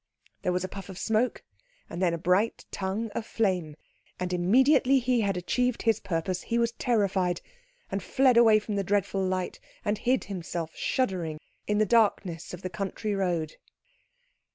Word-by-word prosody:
There 180 - 0
was 180 0 0
a - - -2
puff 195 0 -9
of 190 - -8
smoke, 225 +4 0 0.4
and 175 - -6
then 180 -2 +3
a 170 - -1
bright 185 +7 +1
tongue 205 +4 -3
of 225 - -3
flame; 185 -9 -1 0.4
and 180 0 -2
immediately 260 - +4
he 250 -2 +2
had 195 -3 0
achieved 250 +7 0
his 225 -2 +3
purpose 180 -1 -2
he 235 - -1
was 235 0 +2
terrified, 195 -7 +1 0.5
and 195 0 -1
fled 260 +3 +3
away 225 -2 +7
from 210 -1 -3
the 200 - +1
dreadful 195 0 0
light, 185 -1 -2 0.3
and 210 0 0
hid 255 +2 +1
himself, 170 -4 -5
shuddering, 180 -11 -1 0.3
in 210 - +1
the 215 - +4
darkness 195 -6 +1
of 180 +1 -8
the - - -1
country 200 +3 -3
road. 175 -5 -1
195 Hz, 170 wpm, -28 LUFS, 180-225 Hz, 0.5 s, away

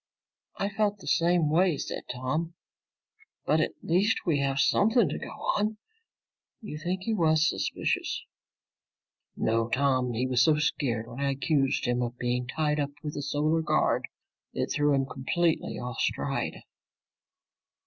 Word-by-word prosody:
"I 200 - -1
felt 205 0 0
the 195 - -14
same 170 -1 +3
way," 170 -1 +3
said - - -5
Tom. 155 +7 -2 0.9
"But 155 - +3
at - - -1
least 190 +6 +2
we 160 -5 +2
have 135 -1 0
something 220 - +4
to 145 - -3
go - - -7
on. 210 +1 -1 0.8
You 180 -10 -7
think 180 +4 -2
he 225 - -1
was 160 -4 +3
suspicious?" - - -1 1.1
"No, 115 +1 +1
Tom. 130 -1 +1
He 120 +3 0
was 130 -1 +2
so 155 +3 +5
scared 120 -7 -1
when 120 +2 -9
I 140 0 +1
accused 135 0 +1
him 120 0 +1
of 120 0 -3
being 125 0 -1
tied 150 +2 0
up 140 -1 0
with 150 -1 -4
the 145 - -4
Solar 150 +3 +1
Guard - - +1 0.5
it - - -2
threw 145 0 +2
him 135 -1 +1
completely 160 +6 -1
off 125 -1 -5
stride." - - -2
150 Hz, 150 wpm, -28 LUFS, 130-170 Hz, 1.1 s, so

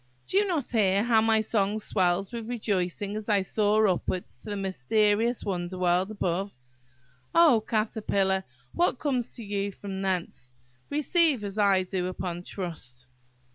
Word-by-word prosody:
Do - - -6
you 410 0 +4
not 325 -9 -2
hear 200 -3 +3
how 230 -2 +4
my 220 0 +3
song 210 -1 0
swells 190 -2 0
with 230 -1 -6
rejoicing 205 -3 -2
as 215 0 -5
I 200 -2 +3
soar 215 +2 +2
upwards 185 -1 -2
to - - -11
the 205 - -2
mysterious 205 - +1
wonder 180 -1 -3
world 180 +1 +2
above? 195 -4 -2 0.8
Oh, 305 -10 +6
Caterpillar! 200 -3 0 0.3
what 345 -6 +1
comes 255 -4 -1
to 235 - -8
you 200 -1 -2
from 195 -1 -6
thence, 180 -9 -3 0.4
receive, 300 -3 +2
as 200 +1 -4
I 195 -2 +4
do, 180 -1 -2
upon 180 -1 -4
trust." 160 -10 -6
205 Hz, 150 wpm, -27 LUFS, 185-220 Hz, 0.8 s, Oh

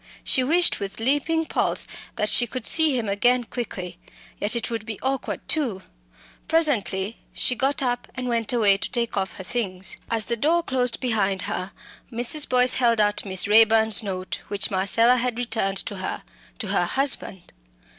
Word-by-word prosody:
She 260 - +2
wished 335 +6 +2
with 200 0 -6
leaping 290 +7 +1
pulse - - 0 0.3
that 210 - -1
she 240 +3 +4
could 250 0 -7
see 315 -5 +4
him 230 -3 -3
again 240 +5 +1
quickly. 185 -8 -7 0.4
Yet 210 +3 0
it 235 0 -3
would 225 -2 -4
be 220 -2 -6
awkward 265 0 -3
too. 245 -12 0 0.6
Presently 230 -10 0 0.2
she - - +3
got 270 +3 -1
up 245 -1 -2
and 255 -1 -5
went 230 -2 -1
away 210 -5 +3
to - - -4
take 235 -1 -1
off 190 -1 -2
her 190 - -7
things. 190 -3 -3
As 225 -2 -2
the 235 - -2
door 325 +8 +1
closed 250 -5 -1
behind 200 -7 -1
her, 185 +2 -4 0.4
Mrs. 245 +6 +1
Boyce 250 0 +5
held 235 -3 +2
out 205 0 +1
Miss 190 0 +1
Raeburn's 220 0 +5
note, 185 -3 -5
which 205 +1 -1
Marcella 230 +6 +4
had 245 -1 -2
returned 220 -5 -2
to 205 - -6
her, 185 - -5 0.3
to 220 -6 -5
her 190 -3 +1
husband. 265 -5 0
230 Hz, 175 wpm, -23 LUFS, 200-255 Hz, 0.6 s, Boyce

